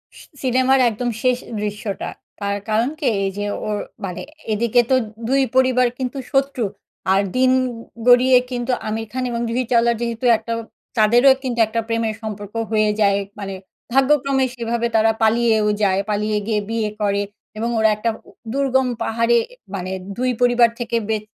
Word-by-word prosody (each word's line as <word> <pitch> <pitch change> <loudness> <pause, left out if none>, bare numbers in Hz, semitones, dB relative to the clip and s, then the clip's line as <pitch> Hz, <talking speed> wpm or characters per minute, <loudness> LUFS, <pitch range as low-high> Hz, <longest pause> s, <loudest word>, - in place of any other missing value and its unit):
স - - -13 0.2
সিনেমার 260 +1 +3
একদম 240 +2 -3
শেষ 250 -1 +3 0.2
দৃশ্যটা, 205 -1 -4 0.3
তার 200 0 -1
কারণ 225 +4 +2
কি? 295 - 0 0.2
এই 195 - +1
যে 205 - -2 0.2
ওর 210 -1 -1 0.3
মানে 180 -1 -5 0.3
এদিকে 235 +3 +3
তো - - +6 0.3
২ 275 +1 +3
পরিবার 255 -1 +4
কিন্তু 255 +1 -3
শত্রু 270 -3 +1 0.5
আর 195 - +4 0.2
দিন 255 0 +4 0.6
গড়িয়ে 250 +1 +7
কিন্তু 245 0 -2 0.2
আমির 220 +1 -3
খান 255 +2 -2
এবং 235 0 -2
জুহি 245 +2 0
চাওলার 235 0 +4
যেহেতু 235 +1 -3
একটা 225 +1 -5 0.4
তাদেরও 240 +5 +6
কিন্তু 245 -3 -2
একটা 225 +1 -2
প্রেমের 230 -1 -1
সম্পর্ক 205 -2 -6 0.2
হয়ে 215 -1 +3
যায় 200 -1 +4 0.2
মানে, 195 -1 -5 0.4
ভাগ্যক্রমে 270 0 +3
সেভাবে 235 0 -1
তারা 225 0 +4
পালিয়েও 220 -1 +3 0.2
যায়। 190 -1 +3
পালিয়ে 210 0 0
গিয়ে 215 -2 +1
বিয়ে 225 -2 -1
করে 200 -1 +1 0.4
এবং 230 +2 -1
ওরা 220 0 +4
একটা 230 +2 0 0.2
উ - - -15
টা 225 - -14
দুর্গম 265 -1 +2 0.2
পাহাড়ে 230 +1 +2 0.4
মানে 185 -1 -4 0.3
২ 255 +1 +1
পরিবার 245 -1 +5
থেকে 235 -1 -1
বেঁ 215 -1 0
230 Hz, 165 wpm, -20 LUFS, 215-255 Hz, 0.6 s, গড়িয়ে